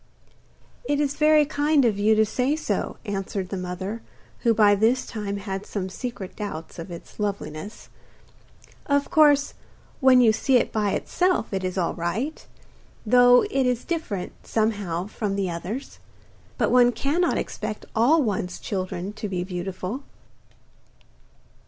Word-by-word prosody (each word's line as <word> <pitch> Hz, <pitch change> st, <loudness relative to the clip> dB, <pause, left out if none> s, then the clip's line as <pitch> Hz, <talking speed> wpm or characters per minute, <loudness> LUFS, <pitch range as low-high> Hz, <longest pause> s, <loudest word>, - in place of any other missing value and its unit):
'It 290 Hz, -, +2 dB
is 285 Hz, -2 st, +1 dB
very 305 Hz, 0 st, +4 dB
kind 290 Hz, -1 st, +2 dB
of 210 Hz, -4 st, +1 dB
you 215 Hz, +2 st, +4 dB
to 220 Hz, 0 st, +4 dB
say 255 Hz, +6 st, 0 dB
so,' 315 Hz, -, -2 dB
answered 195 Hz, -2 st, -3 dB
the -, -, -3 dB
mother, 185 Hz, +4 st, -5 dB, 0.4 s
who 235 Hz, -, +2 dB
by 210 Hz, -2 st, +5 dB
this 225 Hz, +5 st, +2 dB
time 205 Hz, -2 st, -4 dB
had 195 Hz, -1 st, -5 dB
some 190 Hz, -2 st, -4 dB
secret 200 Hz, -3 st, -6 dB
doubts 170 Hz, -6 st, -6 dB
of 165 Hz, -, -7 dB
its 170 Hz, +4 st, -11 dB
loveliness. 200 Hz, -2 st, -4 dB, 1.0 s
'Of 285 Hz, 0 st, +1 dB
course, 290 Hz, -2 st, +5 dB, 0.5 s
when 260 Hz, -2 st, +6 dB
you 230 Hz, -3 st, +5 dB
see 260 Hz, +3 st, +3 dB
it -, -, 0 dB
by 210 Hz, -2 st, 0 dB
itself 360 Hz, -, 0 dB
it 190 Hz, -1 st, -1 dB
is 185 Hz, +1 st, -3 dB
all 175 Hz, -2 st, 0 dB
right, 195 Hz, -, -3 dB, 0.6 s
though 245 Hz, +2 st, +6 dB
it 270 Hz, -2 st, +2 dB
is 250 Hz, -1 st, -1 dB
different, 315 Hz, -, -3 dB
somehow, 205 Hz, -6 st, -1 dB
from 210 Hz, -1 st, -3 dB
the 195 Hz, -3 st, -1 dB
others. 195 Hz, +10 st, -6 dB, 0.6 s
But -, -, +1 dB
one 245 Hz, -1 st, +6 dB
cannot 330 Hz, +8 st, +1 dB
expect 215 Hz, -, -4 dB
all 280 Hz, +8 st, +4 dB
one's 185 Hz, -5 st, -2 dB
children 185 Hz, -1 st, -4 dB
to 210 Hz, -1 st, -5 dB
be 180 Hz, -2 st, -2 dB
beautiful! 185 Hz, +5 st, -5 dB
215 Hz, 145 wpm, -24 LUFS, 190-260 Hz, 1.0 s, when